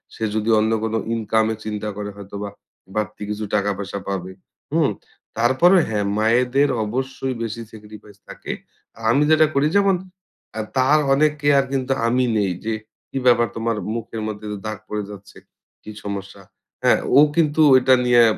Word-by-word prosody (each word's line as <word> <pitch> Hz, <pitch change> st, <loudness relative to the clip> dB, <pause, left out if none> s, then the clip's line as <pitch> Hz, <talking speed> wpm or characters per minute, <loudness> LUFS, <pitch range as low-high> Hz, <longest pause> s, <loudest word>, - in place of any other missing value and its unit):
সে 110 Hz, -, -6 dB
যদি 110 Hz, +1 st, -1 dB
অন্য 110 Hz, +1 st, +1 dB
কোন 110 Hz, -, -2 dB, 0.2 s
ইনকামের 110 Hz, -1 st, 0 dB
চিন্তা 105 Hz, 0 st, -3 dB
করে 105 Hz, 0 st, -4 dB
হয়তোবা 100 Hz, 0 st, -6 dB, 0.5 s
বাড়তি 105 Hz, 0 st, -3 dB
কিছু 105 Hz, 0 st, -3 dB
টাকা 100 Hz, -1 st, +1 dB
পয়সা 100 Hz, 0 st, -5 dB
পাবে, 95 Hz, -1 st, -3 dB, 0.4 s
হুম? -, -, +3 dB, 0.5 s
তারপরে 130 Hz, +11 st, +4 dB
হ্যাঁ 105 Hz, -2 st, -1 dB
মায়েদের 125 Hz, +6 st, +3 dB, 0.2 s
অবশ্যই 130 Hz, +2 st, -3 dB
বেশি 115 Hz, 0 st, -4 dB
sacrifice 105 Hz, -1 st, -13 dB
থাকে। -, -, -7 dB, 0.6 s
আমি 140 Hz, +5 st, +4 dB
যেটা 155 Hz, 0 st, +6 dB
করি 140 Hz, +2 st, +3 dB
যেমন 200 Hz, -2 st, +4 dB, 0.6 s
আ -, -, 0 dB, 0.2 s
তার 140 Hz, +4 st, +4 dB
অনেক 150 Hz, +2 st, +4 dB
কেয়ার 145 Hz, -1 st, +4 dB
কিন্তু 135 Hz, 0 st, 0 dB
আমি 125 Hz, +2 st, +2 dB
নেই 100 Hz, -3 st, +1 dB
যে 110 Hz, -, 0 dB, 0.4 s
"কী -, -, -5 dB
ব্যাপার 120 Hz, -1 st, +5 dB
তোমার 115 Hz, 0 st, -1 dB, 0.2 s
মুখের 115 Hz, -1 st, -5 dB
মধ্যে 105 Hz, 0 st, -6 dB
যে 105 Hz, -, -4 dB
দাগ 110 Hz, -1 st, -3 dB
পড়ে 105 Hz, 0 st, -2 dB
যাচ্ছে, 100 Hz, 0 st, -12 dB, 0.5 s
কী 110 Hz, -, -8 dB
সমস্যা?" 100 Hz, -1 st, -6 dB, 0.4 s
হ্যাঁ, -, -, +4 dB, 0.2 s
ও -, -, +9 dB, 0.2 s
কিন্তু 155 Hz, -1 st, +2 dB, 0.2 s
এটা 130 Hz, +1 st, +4 dB
নিয়ে 120 Hz, -1 st, +6 dB
110 Hz, 160 wpm, -21 LUFS, 105-130 Hz, 0.6 s, ও